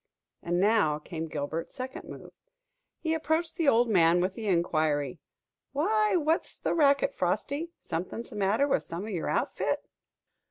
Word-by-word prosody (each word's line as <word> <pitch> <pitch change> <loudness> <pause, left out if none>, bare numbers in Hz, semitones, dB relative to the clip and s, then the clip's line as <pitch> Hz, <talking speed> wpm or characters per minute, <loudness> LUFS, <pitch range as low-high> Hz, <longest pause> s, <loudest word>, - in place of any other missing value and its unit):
And 175 +1 0
now 200 -7 +3
came 160 +1 -6
Gilbert's 155 +2 -4
second 260 0 -6
move. - - -10 0.6
He 320 -1 -1
approached 320 +1 0
the 330 -4 0
old 240 -2 +5
man 175 -5 +4
with 185 +2 0
the 220 +1 -6
inquiry, 155 -6 +1 0.5
"Why, 420 +7 +2
what's 320 -1 0
the - - -1
racket, 300 - +3
Frosty? 315 - -1
Something 180 +7 -4
the 220 - -11
matter 205 +7 +2
with 275 - +2
some 170 +3 -6
of 215 - -5
your 175 -5 -2
outfit?" - - -1
220 Hz, 155 wpm, -29 LUFS, -, 0.6 s, old